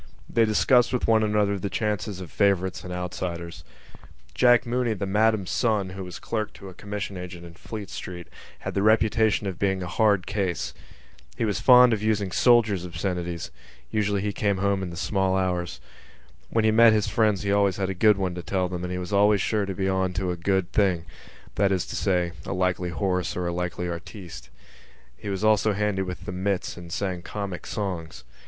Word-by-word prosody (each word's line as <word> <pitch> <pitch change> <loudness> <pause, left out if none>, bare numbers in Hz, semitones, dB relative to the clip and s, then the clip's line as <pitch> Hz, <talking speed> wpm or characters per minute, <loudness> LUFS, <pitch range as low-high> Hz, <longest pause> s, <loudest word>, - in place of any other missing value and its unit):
They 115 -1 +3
discussed 120 +3 +3
with 125 - 0
one 110 -1 +4
another 105 -2 +1
the 100 - -3
chances 105 -1 -2
of 90 - -9
favourites 95 -2 +1
and 90 - -7
outsiders. 90 -1 -5 0.7
Jack 120 - +5
Mooney, 120 -1 0
the 100 - -3
Madam's 105 -1 +1
son, 105 -6 +1
who 95 0 -6
was 90 -1 -8
clerk 110 -2 -3
to 100 - -10
a - - -11
commission 100 0 -5
agent 90 -1 -8
in 85 - -11
Fleet 105 +4 -8
Street, 90 -1 -7 0.3
had - - -4
the 100 - 0
reputation 110 0 +3
of 95 -3 -4
being 95 -2 0
a - - -4
hard 100 0 +2
case. 100 -4 -2 0.6
He - - 0
was 100 -5 -1
fond 125 -2 +7
of 105 - -1
using 105 -3 0
soldiers' 110 -5 +4
obscenities: 85 -1 -4 0.4
usually 100 -2 0
he 105 -1 -1
came 100 -1 0
home 100 0 +1
in 95 - -4
the 85 - -8
small 95 0 0
hours. 90 -7 -1 0.7
When 115 -1 +1
he 110 - +4
met 115 0 +7
his 105 -2 +2
friends 105 -2 +1
he 100 - -1
had 100 - +3
always 100 -2 +2
a 95 -1 -1
good 105 +2 +4
one 95 -2 -1
to 90 - -5
tell 95 +1 -1
them 90 -1 -5
and 90 - -4
he 90 - -2
was 90 +2 -5
always 100 +1 +4
sure 105 -1 0
to 95 - -4
be 95 +1 -1
on 95 -1 0
to 90 0 -1
a - - -2
good 95 +1 0
thing—that 95 +1 -1
is 95 -2 0
to - - -6
say, 90 -3 +1
a - - -4
likely 90 -1 0
horse 90 0 -1
or 90 - -2
a 85 - -1
likely 90 0 -3
artiste. 85 - -8 0.7
He 100 - -7
was 95 +1 -3
also 110 0 +3
handy 105 -1 0
with 90 -1 -5
the - - -4
mits 95 +1 -2
and 85 -1 -10
sang 95 -1 -2
comic 100 -1 -5
songs. 90 - -4
95 Hz, 200 wpm, -25 LUFS, 90-105 Hz, 0.7 s, fond